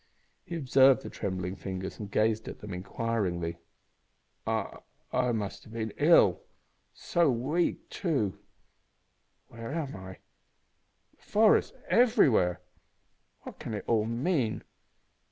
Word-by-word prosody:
He 170 - -6
observed 135 -3 +5
the - - -7
trembling 95 -1 -3
fingers 95 -1 -6
and 105 -2 -6
gazed 110 +1 +1
at - - -6
them 105 -2 -8
inquiringly. 90 -3 -2 0.9
"I - - -2 0.3
I 125 -1 +2
must 105 -4 -3
have 110 - -13
been 110 -2 -3
ill. 145 - +5 0.5
So 170 -3 +1
weak, 135 +8 0
too! 135 - -1 1.1
Where 115 +2 -7
am 150 -3 -3
I? 95 0 -8 1.0
The - - -32
forest 215 0 +3
everywhere! 175 - +4 0.8
What - - -10
can 110 - -5
it 105 - -5
all 110 -2 +2
mean? 120 0 -1
115 Hz, 120 wpm, -29 LUFS, 100-140 Hz, 1.1 s, observed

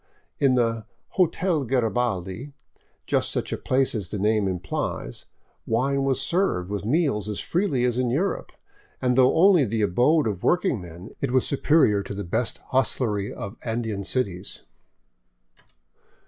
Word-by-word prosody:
In 135 -2 +4
the 115 -2 0
" - - -47
Hotel 175 -3 +2
Garabaldi 120 -2 -1 0.2
" - - -39
— - - -43
just - - +2
such - - -2
a - - +1
place 130 +1 +1
as 105 -7 -3
the 105 - -3
name 105 0 +2
impHes 90 -8 -4 0.2
— - - -40
wine 135 +4 +1
was 135 -1 +1
served 135 - 0
with 100 -1 -3
meals 115 - 0
as 105 - -3
freely 170 -9 0
as 125 0 +1
in 125 -1 +1
Europe, 165 +11 -1 0.5
and 125 -1 +1
though 130 +3 +4
only 180 -2 +6
the 110 -2 -1
abode 125 - +3
of 100 -5 -2
working 180 - +1
men, 90 +3 -10
it 140 - 0
was 130 0 +2
superior 140 -7 +3
to 100 - -7
the 100 - -4
best 105 +7 -1
hostlery 115 -6 0
of 100 +4 -7
Andean 110 -3 -3
cities. 100 -6 -3
120 Hz, 160 wpm, -25 LUFS, 105-135 Hz, 0.5 s, only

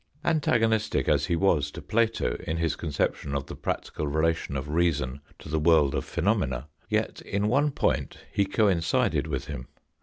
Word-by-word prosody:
Antagonistic 115 -9 +2
as - - +2
he 85 - +1
was 80 -5 +2
to - - -9
Plato 115 - 0
in 80 - -1
his 80 -3 0
conception 75 -2 -2
of 70 0 -2
the - - -8
practical 75 - -3
relation 80 -1 0
of 65 +1 -4
reason 75 -4 0 0.2
to - - -12
the 80 +1 0
world 75 -3 +4
of - - -1
phenomena, 65 +2 0 0.2
yet - - -1
in 100 +1 -1
one 140 +5 +3
point 140 - -1 0.2
he 100 - +2
coincided 95 -6 +2
with 70 -4 -3
him. 60 +1 -6
80 Hz, 170 wpm, -27 LUFS, 70-100 Hz, 0.2 s, world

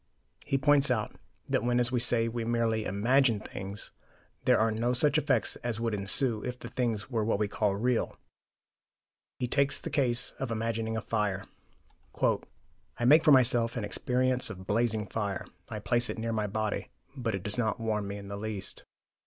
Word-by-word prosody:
He 135 - 0
points 145 0 +4
out 110 -4 -1 0.3
that - - 0
when, 120 0 +2
as 120 0 +1
we 125 - +1
say, 115 -1 +3
we 115 0 -3
merely 115 -2 0
"imagine" 115 +3 +2
things, 100 -1 -6 0.5
there - - +5
are 110 0 +2
no 115 +3 0
such 145 +4 +3
effects 145 -2 +1
as 120 -2 -3
would 115 -1 -1
ensue 105 +3 +1
if 125 0 -4
the 120 - -8
things 115 -4 -2
were 115 -3 0
what 110 -1 +1
we 105 0 0
call 105 -1 0
"real." 120 +3 0 1.2
He 125 - -2
takes 140 +2 +1
the - - -6
case 125 -3 +1
of 135 - -3
imagining 115 0 -2
a - - -2
fire. 105 -4 -1 0.8
"I 120 - -3
make 150 +5 +7
for 150 - +5
myself 120 -3 +5
an 115 - -2
experience 125 +3 +1
of 95 -3 -8
blazing 110 0 +1
fire; 100 -3 -3 0.2
I 110 - -5
place 120 +4 +1
it - - -4
near 115 +1 -2
my 105 -1 0
body; 110 +1 -2 0.3
but 115 -6 -2
it 95 - -6
does 105 +3 +1
not 110 -2 0
warm 105 -2 -1
me 100 +1 -5
in 100 -1 -9
the 100 0 -5
least. 105 -2 -5
115 Hz, 185 wpm, -29 LUFS, 105-125 Hz, 1.2 s, make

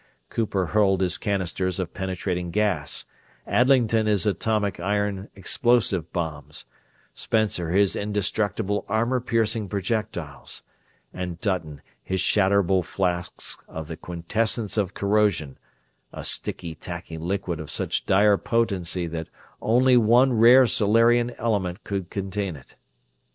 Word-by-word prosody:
Cooper 100 -5 -1
hurled 95 +1 +2
his 90 -2 0
canisters 95 -3 -1
of 95 - -4
penetrating 90 -2 -3
gas, 95 -5 0 0.4
Adlington 120 -4 +3
his 105 -1 +2
atomic 105 -2 0
iron 100 +1 -1
explosive 105 -2 +1
bombs, 80 -4 -5 0.5
Spencer 105 -7 0
his 100 +2 +3
indestructible 105 0 -1
armor 120 +4 +1
piercing 115 -3 0
projectiles, 100 - -4 0.5
and 90 -2 -5
Dutton 85 -8 -3 0.2
his 95 0 -3
shatterable 95 -1 +3
flasks 90 -1 -2
of 80 -1 -7
the 80 - -6
quintessence 100 +7 -2
of 100 -3 -1
corrosion 100 -8 +1 0.5
a - - -8
sticky, 85 -2 -3
tacky 85 0 -7
liquid 90 0 -3
of 80 - -7
such - - -1
dire 100 +1 +5
potency 95 -6 0
that 80 -1 -5 0.3
only 125 +3 +4
one 120 +3 +5
rare 120 +3 +7
Solarian 115 +2 +3
element 100 -4 -1
could 95 -3 -4
contain 100 -2 -3
it. 65 - -15
100 Hz, 120 wpm, -24 LUFS, 90-110 Hz, 0.5 s, rare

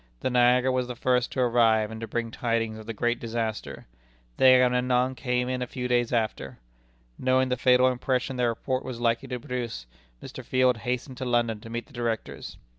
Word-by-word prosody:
The 130 - -1
Niagara 125 +1 +4
was 130 -1 0
the 125 - -5
first 125 0 +1
to 130 - 0
arrive 115 -3 +3
and 110 0 -8
to 115 - -4
bring 115 0 -3
tidings 115 -2 -2
of 110 - -12
the - - -3
great 120 +3 -1
disaster. 115 -1 -4 0.5
The - - +3
Agamemnon 125 0 +4
came 125 -1 -1
in 130 0 -2
a 125 - -2
few 125 0 -4
days 120 -1 +1
after. 115 -3 -2 0.6
Knowing 130 0 +2
the 125 - +1
fatal 125 +1 +4
impression 130 +1 -1
their 125 -1 +1
report 130 +3 -2
was 125 -3 -6
likely 115 +2 0
to 125 -1 -4
produce, 120 - -5 0.3
Mr. - - -9
Field 130 -2 +2
hastened 125 +3 -4
to 130 - -4
London 120 -3 +1
to 115 - -11
meet 120 +1 -4
the 140 - -21
Directors. 115 -2 -4
125 Hz, 195 wpm, -26 LUFS, 115-125 Hz, 0.6 s, Niagara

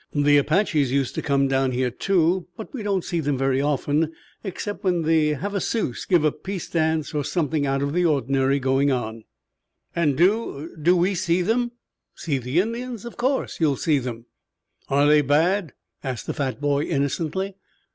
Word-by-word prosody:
The 145 0 +4
Apaches 150 -2 +2
used 135 -2 0
to - - -3
come 140 -1 +2
down 135 -1 +1
here, 125 0 0
too, 180 +4 +1
but 220 - -9
we 260 - -5
don't 200 -3 0
see 170 - -2
them 145 -3 0
very 135 0 +1
often 150 +2 0 0.3
except 205 +1 -5
when 180 -3 +1
the 155 -1 +2
Havasus 200 - -2
give 175 -4 +3
a 155 - +3
peace 190 +2 -6
dance 160 -2 0
or 150 - -3
there's 145 0 -2
something 155 -3 0
out 135 0 0
of 140 +1 -2
the 180 +1 +2
ordinary 135 -3 +2
going 135 +1 +2
on." 115 -3 -3 0.7
"And 150 -5 +1
do 175 -4 +1
do 175 +4 +4
we 180 +3 +2
see 180 -1 +1
them?" 240 +4 0 0.4
"See 145 -5 -2
the 130 +6 0
Indians? 235 +1 -5
Of 235 - -8
course 260 +2 -1
you'll 150 -4 +2
see 150 +1 +1
them." 120 -2 -6 0.6
"Are 140 +1 +3
they 150 0 +6
bad?" 160 +5 +1 0.3
asked 130 -3 -4
the - - -3
fat 135 -2 -3
boy 145 0 +1
innocently. 165 +6 -2
150 Hz, 180 wpm, -23 LUFS, 140-185 Hz, 0.7 s, they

